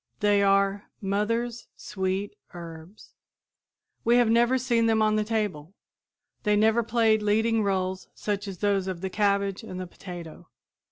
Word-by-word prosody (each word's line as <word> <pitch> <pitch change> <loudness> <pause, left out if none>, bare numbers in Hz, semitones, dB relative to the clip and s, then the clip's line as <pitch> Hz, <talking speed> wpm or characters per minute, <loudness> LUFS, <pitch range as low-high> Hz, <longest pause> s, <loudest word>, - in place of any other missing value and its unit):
They 205 -1 +3
are 195 0 +2
"mother's 230 +4 -2
sweet 190 0 -3 0.2
herbs." 165 +3 -11 0.9
We 235 +1 +4
have 240 -2 +4
never 240 +3 +4
seen 235 -2 +1
them 225 -1 +3
on 215 0 +3
the 215 - +1
table. 205 -6 -3 0.7
They 210 -1 +2
never 220 +2 +3
played 225 -1 +2
leading 220 +2 +2
roles 190 -2 -1
such 205 0 -3
as 195 -2 -6
those 200 -1 0
of 185 -2 -4
the 190 -1 -4
cabbage 200 -1 +1
and 185 -5 -7
the 185 - -4
potato. 175 -2 -10
205 Hz, 150 wpm, -26 LUFS, 190-225 Hz, 0.9 s, We